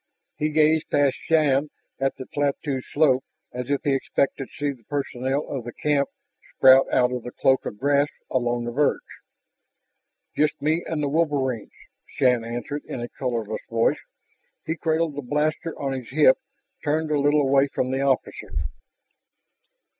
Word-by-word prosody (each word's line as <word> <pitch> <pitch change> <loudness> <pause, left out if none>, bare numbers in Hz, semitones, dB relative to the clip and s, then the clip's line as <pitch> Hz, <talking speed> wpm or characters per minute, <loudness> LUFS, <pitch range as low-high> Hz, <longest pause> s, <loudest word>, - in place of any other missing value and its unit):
He 150 - 0
gazed 155 +1 +3
past 140 -2 +3
Shann 150 -3 +3 0.3
up 135 0 +1
the 130 - -8
plateau 140 -1 -1
slope 135 -4 +3 0.3
as 125 +1 -5
if 140 -1 +1
he 140 - +2
expected 135 0 -1
to - - -17
see 145 -1 -2
the 120 - -25
personnel 135 0 -2
of 135 -4 -4
the 120 0 -7
camp 145 -2 +1 0.5
sprout 130 +1 +6
out 125 -1 +3
of 125 -1 -3
the 125 - -7
cloak 130 +1 +2
of 105 - -6
grass 140 +3 +2 0.2
along 120 -2 0
the 120 - -3
verge. 145 +4 +2 1.4
"Just 150 0 +1
me 155 +4 +1
and 155 -2 -2
the - - +1
wolverines," 140 -7 0 0.4
Shann 125 -3 +2
answered 120 +5 -4
in - - -5
a 120 0 -5
colorless 115 -5 -3
voice. 115 0 +2 0.7
He 160 - -1
cradled 160 -1 0
the 145 - -3
blaster 150 +5 -1
on 135 -1 -2
his 130 -3 -6
hip, 140 -1 +5 0.4
turned 155 +1 0
a 150 - +2
little 145 +1 +3
away 135 +1 +4
from 130 -1 -2
the 135 +1 0
officer. 135 -2 -1
140 Hz, 160 wpm, -24 LUFS, 130-150 Hz, 1.4 s, sprout